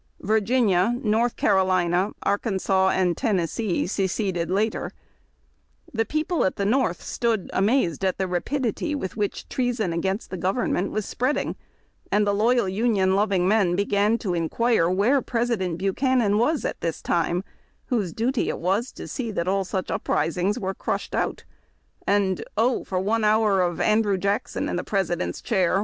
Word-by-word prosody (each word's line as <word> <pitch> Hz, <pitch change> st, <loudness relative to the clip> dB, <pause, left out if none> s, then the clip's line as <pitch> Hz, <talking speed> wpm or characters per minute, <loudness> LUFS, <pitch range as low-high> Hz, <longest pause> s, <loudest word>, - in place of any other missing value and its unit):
Virginia, 215 Hz, -1 st, +2 dB
North 225 Hz, +2 st, +1 dB
Car -, -, +3 dB
olina, 185 Hz, +1 st, +1 dB
Arkansas, 195 Hz, -2 st, +1 dB
and 180 Hz, -3 st, +1 dB
Tennessee 195 Hz, -, 0 dB
seceded 190 Hz, -2 st, -1 dB
later. 210 Hz, +4 st, -1 dB, 1.0 s
The 225 Hz, -1 st, +1 dB
people 310 Hz, +5 st, 0 dB
at 190 Hz, -, 0 dB
the 200 Hz, -, -2 dB
North 215 Hz, -6 st, +1 dB
stood 230 Hz, -5 st, -1 dB
amazed 195 Hz, -, +1 dB
at 190 Hz, -1 st, +1 dB
the 190 Hz, -, -1 dB
rapidity 265 Hz, -, -1 dB
with 190 Hz, -10 st, -4 dB
which 205 Hz, -2 st, -3 dB
treason 240 Hz, -8 st, -1 dB
against 190 Hz, +5 st, -2 dB
the 185 Hz, -, -3 dB
government 190 Hz, 0 st, 0 dB
was 215 Hz, -1 st, -2 dB
spreading, 255 Hz, +4 st, -1 dB, 0.6 s
and 210 Hz, 0 st, +3 dB
the 205 Hz, -, +1 dB
loyal 230 Hz, +1 st, +2 dB
Union 190 Hz, -1 st, +1 dB
loving 195 Hz, -3 st, +2 dB
men 195 Hz, -4 st, +3 dB
began 205 Hz, +3 st, +2 dB
to 195 Hz, -6 st, -3 dB
inquire 175 Hz, +3 st, +1 dB
wdiere 210 Hz, +10 st, +2 dB
President 230 Hz, -8 st, -1 dB
Buchanan 210 Hz, +2 st, +1 dB
was 295 Hz, +6 st, +1 dB
at -, -, -3 dB
this 165 Hz, -1 st, -2 dB
time, 175 Hz, +1 st, 0 dB, 0.4 s
whose 215 Hz, -9 st, -1 dB
duty 235 Hz, -, 0 dB
it -, -, -2 dB
was 195 Hz, +8 st, 0 dB
to -, -, -8 dB
see 240 Hz, -3 st, -4 dB
that 175 Hz, -5 st, -2 dB
all 195 Hz, +1 st, +1 dB
such 190 Hz, -1 st, -3 dB
upris 165 Hz, -, 0 dB
ings 190 Hz, +3 st, 0 dB
were 190 Hz, 0 st, -2 dB
crushed -, -, -3 dB
out; -, -, -1 dB, 0.6 s
and 195 Hz, -2 st, +1 dB
" -, -, -41 dB
Oh 240 Hz, +3 st, +2 dB
for 185 Hz, -, -2 dB
one 215 Hz, +4 st, 0 dB
hour 210 Hz, -2 st, +3 dB
of 175 Hz, -1 st, -1 dB
Andrew 215 Hz, -2 st, +2 dB
Jackson 200 Hz, +3 st, -1 dB
in -, -, -2 dB
the 180 Hz, -, -2 dB
President's 180 Hz, -4 st, -2 dB
chair 190 Hz, -3 st, +2 dB
200 Hz, 165 wpm, -24 LUFS, 185-230 Hz, 1.0 s, Car